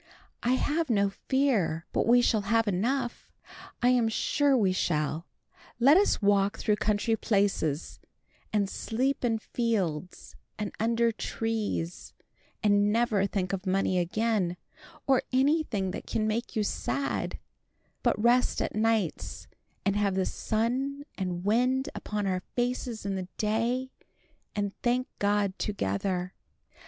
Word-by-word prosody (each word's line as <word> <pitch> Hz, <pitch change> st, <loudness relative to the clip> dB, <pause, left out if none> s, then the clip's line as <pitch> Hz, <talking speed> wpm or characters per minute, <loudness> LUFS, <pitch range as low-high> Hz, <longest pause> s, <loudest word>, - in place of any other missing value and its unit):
"I 245 Hz, -, +2 dB
have 305 Hz, +4 st, 0 dB
no 200 Hz, -3 st, +2 dB
fear 210 Hz, -, 0 dB
but -, -, +1 dB
we 245 Hz, +1 st, +6 dB
shall 220 Hz, -3 st, +3 dB
have 225 Hz, 0 st, +3 dB
enough. 240 Hz, +6 st, -1 dB, 0.5 s
I 245 Hz, -, +6 dB
am 245 Hz, -3 st, +3 dB
sure 280 Hz, +4 st, +2 dB
we 200 Hz, -5 st, +3 dB
shall. 155 Hz, -2 st, -1 dB, 0.5 s
Let 275 Hz, +6 st, +7 dB
us 390 Hz, -, +3 dB
walk 200 Hz, 0 st, +3 dB
through 210 Hz, -1 st, +1 dB
country 215 Hz, +2 st, +1 dB
places, 195 Hz, -, 0 dB, 0.5 s
and 205 Hz, -2 st, +1 dB
sleep 255 Hz, +8 st, -1 dB
in 230 Hz, -2 st, +2 dB
fields 195 Hz, -8 st, -2 dB, 0.2 s
and 210 Hz, -, -3 dB
under 230 Hz, +1 st, +2 dB
trees, 220 Hz, -6 st, -3 dB, 0.5 s
and 205 Hz, 0 st, +4 dB
never 220 Hz, -3 st, +2 dB
think 190 Hz, -2 st, -2 dB
of 195 Hz, 0 st, -3 dB
money 185 Hz, -1 st, +2 dB
again, 185 Hz, 0 st, 0 dB, 0.5 s
or 265 Hz, -2 st, +4 dB
anything 260 Hz, -, +1 dB
that -, -, -7 dB
can 215 Hz, -, 0 dB
make 230 Hz, +4 st, -2 dB
you 215 Hz, -, +2 dB
sad, 275 Hz, +6 st, -2 dB, 0.6 s
but -, -, +2 dB
rest 240 Hz, +3 st, +3 dB
at -, -, -1 dB
nights, 215 Hz, -5 st, -1 dB, 0.4 s
and 200 Hz, 0 st, +2 dB
have 200 Hz, -2 st, +1 dB
the 190 Hz, -1 st, +1 dB
sun 255 Hz, +6 st, -1 dB
and 180 Hz, -1 st, -3 dB
wind 250 Hz, +5 st, +2 dB
upon 210 Hz, -1 st, -3 dB
our 185 Hz, -1 st, 0 dB
faces 245 Hz, -3 st, -2 dB
in 200 Hz, -, -1 dB
the 185 Hz, -1 st, -4 dB
day, 235 Hz, +5 st, 0 dB, 0.6 s
and 205 Hz, -1 st, -1 dB
thank 250 Hz, +1 st, +1 dB
God 205 Hz, -1 st, +1 dB
together. 180 Hz, -, -2 dB
215 Hz, 135 wpm, -28 LUFS, 195-245 Hz, 0.6 s, Let